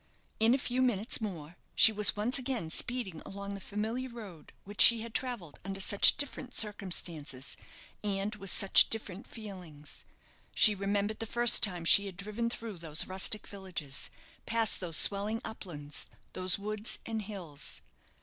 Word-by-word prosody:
In 225 +3 +4
a - - 0
few 255 -1 -2
minutes 230 -2 +1
more 175 -6 -7 0.2
she 225 - +9
was 210 -1 +2
once 225 +6 0
again 245 -11 -4
speeding 225 -6 0
along 200 0 -7
the 200 - -7
familiar 220 +6 -4
road 210 -9 -11
which 205 +1 0
she 230 -2 +8
had 230 0 -8
travelled 235 - -3
under 195 +1 -6
such 200 +1 +5
different 265 -2 -3
circumstances, 170 - -1 0.5
and 200 0 -2
with 195 -2 -4
such 195 +1 +6
different 210 -2 -4
feelings. 180 -9 -10 0.5
She 215 - +6
remembered 200 +2 -2
the 225 - -4
first 240 +1 +3
time 180 -5 +3
she 200 +4 +7
had 185 -3 -10
driven 210 +4 -3
through 225 -5 -6
those 160 -2 0
rustic 190 +3 0
villages, 185 -8 -5 0.4
past 225 -1 +1
those 170 -4 0
swelling 205 +3 +3
uplands, 155 -10 -7 0.2
those 185 0 -1
woods 210 +2 -4
and 225 -1 -4
hills. 175 -8 -6
200 Hz, 155 wpm, -30 LUFS, 185-225 Hz, 0.5 s, she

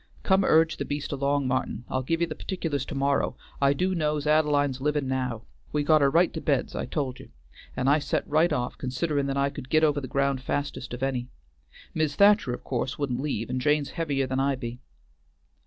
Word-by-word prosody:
Come 190 0 +3
urge 160 -2 +4
the - - -2
beast 145 0 -4
along, 140 0 0
Martin, 125 -2 -2
I'll 130 - -1
give 165 +6 -1
ye - - +4
the 160 - -5
partic'lars 155 -7 -3
to 150 - -5
morrow, 140 +1 +1 0.2
I 140 0 +5
do' 185 +6 0
know's 150 -3 0
Ad'line's 145 -3 +2
livin' 150 -1 0
now. 125 -4 -2 0.3
We 150 -1 0
got 155 0 +4
her 140 - +5
right 170 +5 +3
to 160 - -4
bed's 140 -4 0
I - - -3
told 130 -2 -3
you, - - -12 0.5
and 125 - 0
I 145 +3 +5
set - - -2
right 160 +3 +3
off 125 -4 -2
considerin' 140 +2 -1
that 135 0 -2
I 140 0 +1
could 130 -2 -9
git 155 +2 +3
over 145 -2 +3
the 130 - -5
ground 140 0 0
fastest 135 -2 -3
of 125 - -6
any. 125 -2 -1 0.7
Mis' 155 -2 0
Thacher 200 - +5
of 125 - -5
course 125 0 -2
wouldn't 130 -3 -2
leave 135 -6 -2
and 130 0 -1
Jane's 145 +1 +1
heavier 145 -5 -1
than 130 +1 -2
I 135 0 +2
be." 120 -1 -6
140 Hz, 215 wpm, -26 LUFS, 130-155 Hz, 0.7 s, I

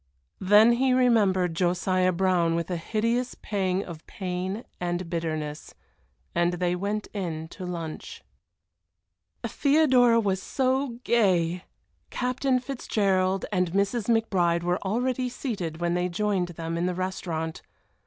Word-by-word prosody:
Then 210 +4 +6
he 255 +2 +2
remembered 205 -9 +3
Josiah 185 +1 +1
Brown 175 -2 +2
with 170 +1 -2
a - - 0
hideous 230 +8 -1
pang 190 -2 -1
of 165 -3 -9
pain 185 +3 -4
and 175 0 -2
bitterness 155 -3 -4 0.6
and 170 +1 +2
they 175 0 0
went 205 +3 -2
in 165 -6 -4
to 185 0 -7
lunch. 165 - -6 1.2
Theodora 255 -3 +4
was 195 -3 0
so 260 0 0
gay! 180 -7 +2 0.4
Captain 255 +1 0
Fitzgerald 195 -7 0
and 180 -3 0
Mrs. 200 +3 +1
McBride 180 -7 +2
were 175 +1 0
already 250 +5 0
seated 190 - -4
when 175 0 0
they 180 +1 0
joined 190 0 0
them 165 -1 -4
in 175 - 0
the 180 - -2
restaurant. 170 -3 -3
185 Hz, 125 wpm, -26 LUFS, 175-230 Hz, 1.2 s, Then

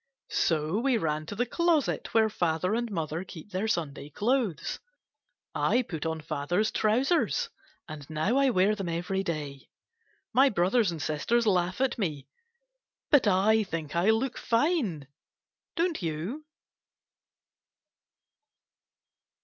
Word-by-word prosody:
So 160 +4 +1
we 255 0 +2
ran; 155 -5 -2
to 205 - -6
the 245 +4 0
closet 335 +2 0
where 225 -1 +4
father 180 -2 0
and 235 +1 -1
mother 165 -3 -3
keep 180 +1 -11
their 190 +4 -1
Sunday 150 -8 -2
clothes. 210 - -1 0.7
I 250 - +2
put 165 -7 -4
on 160 -1 -3
father's 175 +9 -1
trousers, 275 - +1 0.4
and 155 -2 -9
now 160 +11 0
I 275 -1 +4
wear 200 -2 +3
them 195 -4 -4
every 175 +3 -1
day. 150 -7 -5 0.6
My 265 +4 +6
brothers 200 +1 +2
and 165 - -6
sisters 155 - 0
laugh 185 -2 +1
at 265 -2 0
me. 150 -9 -3 0.8
But 285 -7 +5
I 205 +3 +4
think 165 -6 -5
I 175 +5 +3
look 230 +4 +1
fine, 230 - 0 0.7
don't 340 - 0
you 175 - -4
195 Hz, 125 wpm, -28 LUFS, 160-235 Hz, 0.8 s, My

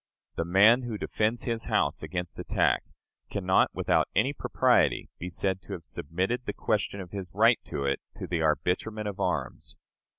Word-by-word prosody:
The 85 - -1
man 105 +8 +6
who 120 -4 -4
defends 110 +3 -1
his 115 -2 -2
house 105 -11 +1
against 90 -2 -5
attack - - +1 0.4
can 100 - -4
not 95 - +4
with - - -6 0.3
any - - +2
propriety - - +2
be 90 - -5
said 95 +1 -1
to 95 - -8
have 85 - -7
submitted 95 - -2
the - - -1
question 105 -2 -1
of 90 -2 -8
his 95 -3 -5
right - - +5
to 70 - -3
it 70 - 0
to - - -6
the 85 -2 -1
arbitrament 95 +7 0
of 100 -1 -5
arms. 80 -9 -2
95 Hz, 175 wpm, -28 LUFS, 85-110 Hz, 0.4 s, man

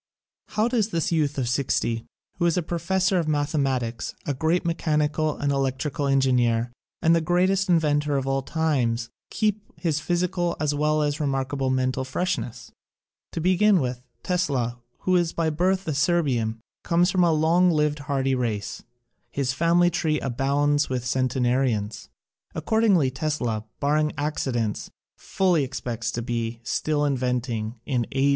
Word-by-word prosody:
How 215 +2 +3
does 230 -4 +1
this 170 -5 -1
youth 150 -3 +1
of 130 -3 0
sixty, 120 -2 0 0.3
who 175 - +3
is 170 - +1
a 180 - +1
pro 170 +1 -3
fessor 190 +2 +1
of 165 - -2
mathematics, 135 -6 -1
a 145 - -1
great 160 +6 0
mechanical 155 -2 0
and 140 0 0
electrical 135 +2 -1
engineer 125 -4 +2 0.3
and 165 +1 +5
the 165 - +2
greatest 185 +3 +2
in 175 - +6
ventor 145 -2 +1
of 135 - -2
all 135 0 0
times, 130 -6 0 0.2
keep 215 -1 0 0.2
his 160 -4 0
physical 175 +1 0
as 150 -1 0
well 150 +1 +1
as 145 0 -1
remarkable 135 -2 -1
mental 130 0 0
freshness? 130 -4 -3 0.6
To - - -2
begin 185 +3 +4
with, 125 -3 -2 0.2
Tesla, 135 -10 -1 0.2
who 185 - +2
is 175 -2 +2
by 165 -1 0
birth 185 +4 0
a 155 - 0
Serbian, 135 -8 +1 0.2
comes 175 +2 +2
from 185 -1 +3
a 170 - +4
long 165 +4 +3
lived 150 -2 +1
hardy 135 -2 0
race. 115 -5 -2 0.5
His 135 -2 -1
family 170 +4 +3
tree 155 -2 0
abounds 140 +3 +1
with 125 -2 -2
centenarians. 125 -4 0 0.5
Accordingly, 200 -11 +2
Tesla 125 -6 -2
— - - -50
barring 150 +1 +1
accidents— 130 -7 -2 0.3
fully 180 -6 +1
expects 120 -3 -4
to 120 - -3
be 115 -1 -3
still 150 +5 0
inventing 125 -4 -1
in 125 -5 -1
A. 135 +1 +3
145 Hz, 150 wpm, -25 LUFS, 130-170 Hz, 0.6 s, in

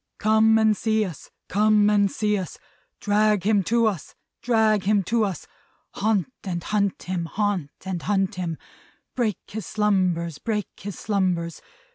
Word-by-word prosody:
Come 220 +1 +4
and 220 -1 +4
see 220 +1 +1
us, 170 -7 -9 0.2
come 210 +1 +3
and 200 -1 +3
see 210 -1 0
us, 185 -4 -5 0.4
Drag 210 -1 +2
him 205 0 +3
to 230 +1 +2
us, 200 -7 -2 0.3
drag 220 -4 +2
him 205 -1 +3
to 225 +4 +1
us, 190 -6 -3 0.5
Haunt 215 +2 0
and 175 -4 -4
hunt 200 -2 -1
him, 180 -2 -3
haunt 195 -4 -1 0.2
and 185 -3 -3
hunt 195 -1 0
him, 175 -4 -4 0.6
Break 230 -6 0
his 215 -3 -6
slumbers, 185 -6 0
break 210 -3 -2
his 200 -2 -7
slumbers! 180 -6 -1
205 Hz, 150 wpm, -24 LUFS, 185-215 Hz, 0.6 s, Come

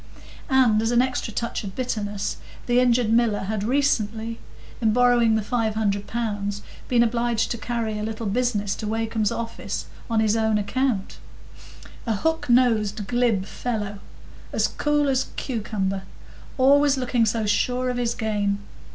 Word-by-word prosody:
And 250 -5 +4
as 225 - 0
an 240 +1 +4
extra 255 -3 -2
touch 235 +1 -3
of 195 -2 -7
bitterness, 210 -5 -2 0.3
the 245 0 +3
injured 245 -2 +3
miller 225 -3 +3
had 200 +1 -2
recently, 230 -3 0 0.4
in 220 -2 +3
borrowing 240 -2 +4
the 220 - 0
five 225 -1 -1
hundred 205 -2 0
pounds, 205 -3 -3 0.2
been 240 -2 +4
obliged 235 -1 0
to 235 - -3
carry 225 -3 -2
a - - -3
little 220 +1 -4
business 205 -2 0
to 215 - -4
Wakem's 220 -1 0
office 230 -1 -4 0.2
on 225 -1 +2
his 220 0 +2
own 220 -1 +2
account. 210 0 -1 0.9
A 225 - +1
hook 320 +7 -1
nosed 220 -4 +3
glib 235 -4 +1
fellow! 210 -3 -4 0.5
as - - +1
cool 295 -1 +1
as 265 -1 +1
a - - -17
cucumber,—always 235 +6 0
looking 245 -3 +1
so 220 0 0
sure 250 +4 +1
of 245 - -4
his 235 -1 0
game! 205 -3 0
225 Hz, 150 wpm, -24 LUFS, 210-245 Hz, 0.9 s, And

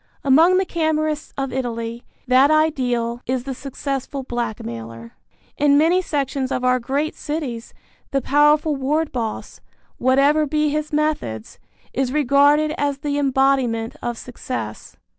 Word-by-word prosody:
Among 320 +7 +5
the 380 - +2
Camorrists 310 -3 -1
of 270 -1 -3
Italy 235 -2 -4 0.2
that 260 +3 +5
ideal 250 -7 +1
is 255 0 -1
the 270 0 -4
successful 275 +1 -4
blackmailer. 115 - -5 0.5
In 285 -1 +4
many 335 +5 +4
sections 275 -5 -2
of 250 - -1
our 255 0 +3
great 280 +6 -1
cities 285 -7 -5 0.3
the 275 - +1
powerful 295 +3 +3
ward 295 +4 0
boss, 230 -4 -5 0.4
whatever 280 +4 +3
be 300 +1 +1
his 305 +1 -2
methods, 295 - -2 0.3
is 260 -1 0
regarded 290 +2 +3
as 285 -1 0
the 285 0 -2
embodiment 265 -4 +1
of 240 -1 -3
success. 235 - -7
275 Hz, 130 wpm, -21 LUFS, 245-300 Hz, 0.5 s, Among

